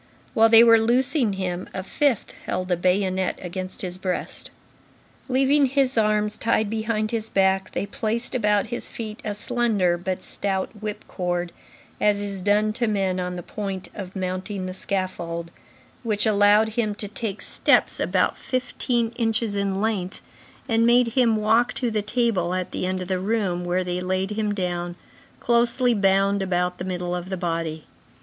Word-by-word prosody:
While 225 Hz, 0 st, +5 dB
they 225 Hz, 0 st, +9 dB
were 230 Hz, -1 st, +7 dB
loosing 240 Hz, 0 st, +2 dB
him, 185 Hz, -2 st, -3 dB
a 190 Hz, -, -3 dB
fifth 265 Hz, +3 st, 0 dB
held 185 Hz, 0 st, -2 dB
a -, -, +4 dB
bayonet 185 Hz, +1 st, +1 dB
against 185 Hz, +2 st, -6 dB
his 180 Hz, 0 st, -5 dB
breast. 185 Hz, -1 st, -4 dB, 0.8 s
Leaving 270 Hz, +2 st, +3 dB
his 270 Hz, 0 st, +1 dB
arms 210 Hz, -1 st, +1 dB
tied 220 Hz, -2 st, +1 dB
behind 220 Hz, -1 st, -1 dB
his 225 Hz, -1 st, -3 dB
back, 190 Hz, 0 st, +1 dB
they -, -, -1 dB
placed 230 Hz, 0 st, -2 dB
about 210 Hz, -5 st, +2 dB
his 240 Hz, -, -3 dB
feet 215 Hz, -2 st, -6 dB
a 210 Hz, -1 st, -3 dB
slender 205 Hz, -6 st, +1 dB
but 185 Hz, +1 st, -3 dB
stout 190 Hz, -2 st, -2 dB
whip 210 Hz, 0 st, -5 dB
cord, 175 Hz, -1 st, -2 dB, 0.5 s
as 210 Hz, -1 st, +3 dB
is 200 Hz, -2 st, -4 dB
done 210 Hz, +2 st, +2 dB
to 235 Hz, +1 st, 0 dB
men 195 Hz, -3 st, 0 dB
on 180 Hz, 0 st, -3 dB
the 175 Hz, -, -6 dB
point 195 Hz, -2 st, -5 dB
of 190 Hz, -2 st, -8 dB
mounting 185 Hz, +1 st, -3 dB
the 185 Hz, -, -4 dB
scaffold, 175 Hz, -3 st, -3 dB, 0.5 s
which 210 Hz, -3 st, 0 dB
allowed 210 Hz, +1 st, +5 dB
him 215 Hz, -2 st, -1 dB
to 205 Hz, -, -6 dB
take 210 Hz, 0 st, -5 dB
steps -, -, +2 dB
about -, -, +1 dB
fifteen 250 Hz, -2 st, -1 dB
inches 225 Hz, -2 st, 0 dB
in 195 Hz, -1 st, -1 dB
length, 200 Hz, -4 st, -2 dB, 0.5 s
and 225 Hz, 0 st, +2 dB
made 240 Hz, 0 st, +5 dB
him 235 Hz, -1 st, +3 dB
walk 220 Hz, +3 st, +2 dB
to 245 Hz, -3 st, -1 dB
the 215 Hz, -1 st, 0 dB
table 210 Hz, -5 st, 0 dB
at 185 Hz, -1 st, -3 dB
the 185 Hz, -, -2 dB
end 185 Hz, 0 st, -2 dB
of -, -, -9 dB
the 185 Hz, -1 st, 0 dB
room, 190 Hz, -3 st, -1 dB
where 180 Hz, +1 st, 0 dB
they 180 Hz, 0 st, -3 dB
laid 185 Hz, +2 st, -1 dB
him 210 Hz, 0 st, -1 dB
down, 175 Hz, -3 st, -2 dB, 0.4 s
closely 240 Hz, +1 st, +2 dB
bound 195 Hz, -1 st, +2 dB
about 180 Hz, -1 st, -1 dB
the -, -, -3 dB
middle 180 Hz, -1 st, -3 dB
of 180 Hz, +1 st, -5 dB
the 190 Hz, -, -3 dB
body. 165 Hz, -3 st, -3 dB
205 Hz, 170 wpm, -24 LUFS, 185-225 Hz, 0.8 s, they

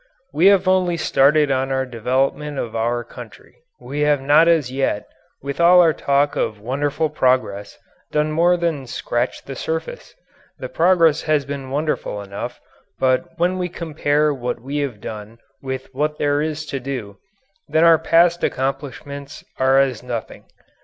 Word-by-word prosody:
We 170 Hz, +6 st, +4 dB
have 195 Hz, -2 st, +4 dB
only 185 Hz, -2 st, +2 dB
started 150 Hz, -1 st, +3 dB
on 135 Hz, 0 st, 0 dB
our 130 Hz, 0 st, 0 dB
development 130 Hz, +4 st, -1 dB
of 115 Hz, -3 st, -4 dB
our 120 Hz, +2 st, -1 dB
country -, -, -13 dB, 0.2 s
we 145 Hz, -, -6 dB
have 150 Hz, -1 st, +3 dB
not 145 Hz, +5 st, +4 dB
as 160 Hz, -7 st, +2 dB
yet, 130 Hz, -6 st, -1 dB, 0.4 s
with 140 Hz, +4 st, -3 dB
all 180 Hz, +1 st, +7 dB
our 165 Hz, -3 st, +5 dB
talk 140 Hz, +1 st, +1 dB
of 105 Hz, -, -2 dB
wonderful 140 Hz, +7 st, -1 dB
progress, 125 Hz, -8 st, 0 dB, 0.3 s
done 150 Hz, 0 st, 0 dB
more 175 Hz, +3 st, +3 dB
than 165 Hz, -6 st, -2 dB
scratch 120 Hz, 0 st, -3 dB
the 135 Hz, -, -7 dB
surface. 160 Hz, +4 st, -5 dB, 0.4 s
The 130 Hz, -, -7 dB
progress 165 Hz, +1 st, +3 dB
has 150 Hz, -3 st, +2 dB
been 140 Hz, -1 st, -6 dB
wonderful 145 Hz, -6 st, -2 dB
enough 100 Hz, 0 st, -7 dB, 0.4 s
but 135 Hz, +6 st, 0 dB
when 180 Hz, +2 st, 0 dB
we 180 Hz, 0 st, -2 dB
compare 150 Hz, -3 st, 0 dB
what 125 Hz, -2 st, -4 dB
we 135 Hz, +5 st, -5 dB
have 135 Hz, -8 st, -3 dB
done 110 Hz, +1 st, -8 dB, 0.2 s
with 130 Hz, 0 st, -6 dB
what 150 Hz, +3 st, -1 dB
there 145 Hz, 0 st, +1 dB
is 155 Hz, 0 st, -3 dB
to 135 Hz, -, -1 dB
do, 120 Hz, -7 st, -6 dB, 0.5 s
then 160 Hz, -, +3 dB
our 165 Hz, -1 st, +6 dB
past 170 Hz, +1 st, +3 dB
accomplishments 140 Hz, +1 st, -4 dB, 0.2 s
are 130 Hz, +1 st, +4 dB
as 130 Hz, -5 st, +1 dB
nothing. 120 Hz, -2 st, -6 dB
140 Hz, 160 wpm, -20 LUFS, 130-160 Hz, 0.5 s, all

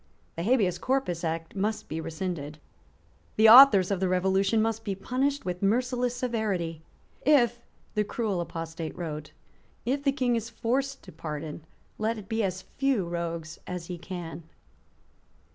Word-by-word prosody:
The 165 Hz, -, -3 dB
Habeas 195 Hz, -4 st, +2 dB
Corpus 255 Hz, -11 st, -1 dB
Act 165 Hz, +1 st, -3 dB
must 210 Hz, +3 st, -1 dB
be 160 Hz, +1 st, -4 dB
rescinded. 160 Hz, -3 st, -4 dB, 0.8 s
The 220 Hz, +1 st, +6 dB
authors 220 Hz, -6 st, +9 dB
of 195 Hz, -, 0 dB
the 190 Hz, -, +1 dB
Revolution 190 Hz, +4 st, +2 dB
must 225 Hz, 0 st, 0 dB
be 200 Hz, -3 st, -2 dB
punished 265 Hz, +8 st, -1 dB
with 180 Hz, -1 st, -3 dB
merciless 245 Hz, +4 st, +1 dB
severity. 210 Hz, -10 st, -2 dB, 0.4 s
"If," 240 Hz, -5 st, +4 dB, 0.3 s
the 210 Hz, -, +2 dB
cruel 210 Hz, -4 st, -2 dB
apostate 165 Hz, -1 st, -5 dB
wrote, 155 Hz, -3 st, -5 dB, 0.5 s
"if 270 Hz, +4 st, 0 dB
the 275 Hz, -, +3 dB
King 255 Hz, -3 st, +1 dB
is 230 Hz, 0 st, -3 dB
forced 270 Hz, +5 st, -1 dB
to -, -, -11 dB
pardon, 155 Hz, 0 st, -6 dB, 0.3 s
let 220 Hz, +1 st, 0 dB
it 205 Hz, -2 st, -9 dB
be 225 Hz, +2 st, 0 dB
as 185 Hz, -2 st, -2 dB
few 270 Hz, -10 st, 0 dB
rogues 170 Hz, -1 st, -4 dB
as 180 Hz, -2 st, -5 dB
he 175 Hz, 0 st, -6 dB
can." 170 Hz, -3 st, -6 dB
195 Hz, 150 wpm, -28 LUFS, 170-235 Hz, 0.8 s, authors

